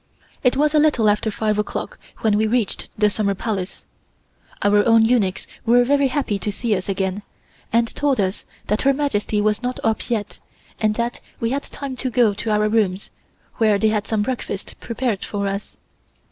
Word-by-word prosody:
It 250 0 +2
was 300 +1 +3
a 305 - +5
little 295 -8 +3
after 210 +1 0
five 215 0 0
o'clock 210 - -3 0.2
when 215 -2 +3
we 215 +1 +2
reached 230 -2 0
the 210 0 +4
Summer 205 -1 0
Palace. 195 -3 -4 0.8
Our 205 0 +4
own 225 0 +5
eunuchs 220 -6 +1 0.2
were 240 +1 +5
very 280 +2 +3
happy 260 -7 -1
to 210 - -2
see 220 +1 0
us 185 +1 -4
again 190 +1 -1 0.5
and 230 0 +1
told 285 -4 +1
us 190 0 -1 0.2
that 210 - 0
Her 275 - +4
Majesty 220 -7 0
was 210 +1 +1
not 250 0 -3
up 225 -1 0
yet 220 -3 -2 0.4
and 215 -1 +1
that 235 +1 -2 0.2
we 230 0 -1
had 280 +1 0
time 275 -2 -6
to 255 - -1
go 240 -4 +3
to 215 +3 -4
our 210 0 +2
rooms, 210 -3 0 0.5
where 215 -3 +4
they 215 +2 +3
had 210 -1 -1
some 215 -2 +1
breakfast 225 -4 -4
prepared 230 -4 -2
for 200 -1 -2
us. 200 +1 -5
220 Hz, 190 wpm, -21 LUFS, 205-245 Hz, 0.8 s, a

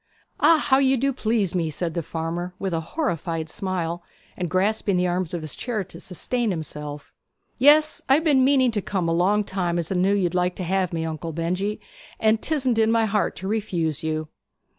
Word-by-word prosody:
'Ah! 330 - +6
How 275 -3 +3
you 265 -1 +3
do 275 +3 +1
please 220 -6 0
me!' 170 -3 0
said 165 +2 -3
the 170 - -1
farmer, 170 +3 -4
with 190 -2 -3
a 165 - +1
horrified 165 - -3
smile, 175 -2 -3 0.3
and 180 -2 -3
grasping 195 +2 +1
the 180 - +2
arms 180 -1 -1
of 170 -3 -4
his 155 - -4
chair 230 -5 -2
to 185 - -12
sustain 235 +6 -2
himself. 150 -4 -5 0.5
'Yes; 305 +3 +5
I 270 - +7
have 315 - +1
been 285 -5 +4
meaning 260 -2 +4
to 210 -2 -1
come 185 -3 -2
a 165 - +1
long 195 +5 +2
time, 180 -3 -2
as 170 0 -2
I - - 0
knew 190 +3 +3
you'd 180 -4 0
like 180 0 +1
to 185 - -4
have 185 0 0
me, 165 -1 -2
Uncle 160 +1 -4
Benjy; 185 +6 -2 0.4
and 220 0 +3
'tisn't 260 -7 +1
in 220 0 +4
my 225 -1 +3
heart 210 -1 0
to 190 - -6
refuse 175 -8 -1
you.' 155 0 -2
185 Hz, 205 wpm, -24 LUFS, 165-225 Hz, 0.5 s, I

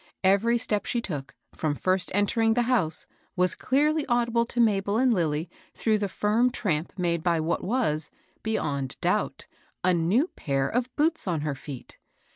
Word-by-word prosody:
Every 200 +5 +4
step 225 -4 -1
she 240 - 0
took, 150 -12 -5 0.2
fipom 150 -2 -1
first 185 0 +1
entering 225 +2 +2
the 245 - +3
house, 225 -11 +1 0.3
was 180 -1 +2
clearly 300 +3 +1
audible 235 -1 +2
to 240 - -4
Mabel 205 -2 +2
and 255 0 +4
Lilly 160 -3 0 0.3
through 215 -2 +1
the 205 - 0
firm 220 +6 +2
tramp 170 -9 -2
made 170 -2 0
by 170 -1 +1
what 160 +2 -1
was, 185 - 0 0.3
beyond 140 -11 -2
doubt, - - 0 0.4
a 185 0 +4
new 180 - +2
pair 135 -2 -1
of 245 +1 -1
boots 315 -4 +1
on 165 -4 0
her 150 -1 -1
feet. 135 -1 -9
200 Hz, 165 wpm, -26 LUFS, 160-235 Hz, 0.4 s, Every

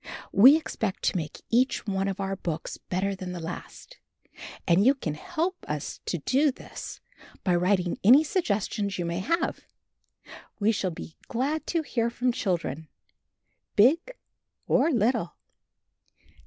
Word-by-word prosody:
We 250 +9 +8
expect 220 -10 -3
to - - +1
make 155 -4 -4
each 250 +3 +2
one 195 -2 -1
of 195 0 -3
our 195 0 -2
books 165 -4 -4
better 190 +2 -2
than 185 -1 -6
the 175 - -5
last, 175 - -8 0.7
and 175 +2 +5
you 265 +5 +5
can 165 - -3
help 345 - -3
us 150 -1 -4
to 175 - 0
do 270 - +2
this - - -9 0.4
by 180 - +2
writing 180 0 +1
any 255 +9 +8
suggestions 210 - -1
you 175 - -2
may 170 +1 -2
have. 335 - 0 1.0
We 210 +2 +3
shall 200 -3 -1
be 160 -1 -9
glad 280 +6 -1
to 330 -2 0
hear 235 -5 0
from 245 +1 0
children, 170 - -2 0.9
big 320 - +4 0.5
or - - +3
little. 230 - +1
205 Hz, 140 wpm, -27 LUFS, 180-265 Hz, 1.0 s, We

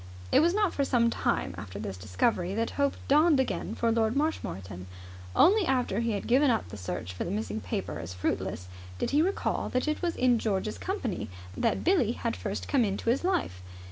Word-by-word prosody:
It - - +6
was 340 +4 +3
not 415 -4 +2
for 280 - +1
some 235 -3 +2
time - - 0
after 100 -1 -8
this 100 -2 -5
discovery 175 - 0
that 230 +1 -1
hope 280 -1 +1
dawned 300 +1 +5
again 265 - -1
for 230 -1 +1
Lord 225 +1 +1
Marshmoreton. 95 - -3 0.5
Only 400 +6 +6
after 250 -6 +1
he 230 -1 0
had 200 - -3
given 265 +4 +4
up 225 - 0
the - - -8
search 90 -1 -5
for 90 - -3
the - - -4
missing 105 0 -3
paper 90 0 -4
as 85 +2 -6
fruitless 90 0 -2 0.3
did - - -1
he 295 - +4
recall 380 +4 0
that 255 +4 -1
it 305 - -1
was 345 -2 -1
in 250 -2 +3
George's 210 0 -1
company 370 - -3 0.3
that - - 0
Billie 310 - +3
had 230 -1 -2
first 205 -1 -4
come 270 -4 +3
into 205 +2 0
his 265 - 0
life. 220 - -1
230 Hz, 205 wpm, -29 LUFS, -, 0.5 s, It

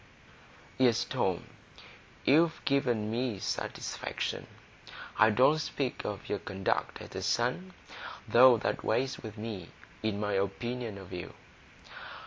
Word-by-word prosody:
"Yes, 125 -3 +4
Tom, - - -1 0.8
you've 160 +3 +4
given 120 -6 +1
me 120 -2 -1
satisfaction. - - -3 0.7
I 110 - +7
don't 130 +8 +5
speak 140 -4 -2
of 100 -1 -4
your 105 - -1
conduct 95 -1 -1
as - - -11
a - - -3
son; 125 +11 0 0.5
though 125 0 +8
that 105 - -2
weighs 130 0 0
with 110 -2 -8
me 105 -5 -6 0.3
in 110 -2 -1
my 105 -1 -1
opinion 110 +3 -2
of 95 -2 -10
you. 90 - -6
115 Hz, 120 wpm, -31 LUFS, 105-130 Hz, 0.8 s, though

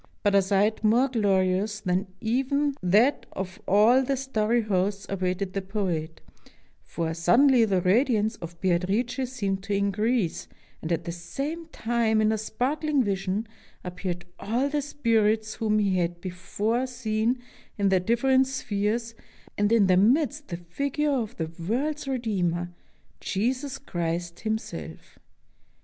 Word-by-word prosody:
But 205 - +3
a 200 - +6
sight 200 +3 +1
more 240 +5 +4
glorious 200 -2 +1
than 185 +1 0
even 270 +6 0
that 210 +10 +3
of 190 +2 -6
all 220 +6 +5
the 270 +1 -1
starry 235 -3 0
hosts 200 0 0
awaited 185 0 -2
the 195 - -1
poet, 180 -5 -3 0.6
for 165 -1 -3
sud 175 +9 +3
denly 255 -6 +5
the 190 -2 +2
radiance 220 +2 +2
of 170 0 -9
Beatrice 210 +9 0
seemed 200 -6 -2
to 200 +1 -2
increase, 200 0 0 0.3
and 160 - -4
at 170 0 0
the 170 - -4
same 275 - -5
time, 230 -6 0
in 215 0 +3
a 220 - +1
sparkling 275 +6 0
vision, 195 +1 -1 0.4
appeared 180 -1 -5
all 240 +7 0
the 295 0 0
spirits 225 -6 +1
whom 215 -2 0
he 200 -3 +2
had 175 -1 -1
before 205 +7 -2
seen 235 -1 -1 0.4
in 200 -1 +2
their 190 -1 +4
different 260 +6 +3
spheres, 230 -2 -2 0.4
and 205 +1 +1
in 230 -3 +5
their 185 -1 +4
midst 250 - +2
the 170 - -4
figure 280 - -2
of 245 -4 -2
the 160 -1 -3 0.2
world's 290 +5 -1
Redeemer, 185 -9 -1 0.5
Jesus 255 +7 -2
Christ 175 -7 -3
Himself. 215 - -5
215 Hz, 140 wpm, -26 LUFS, 185-245 Hz, 0.6 s, a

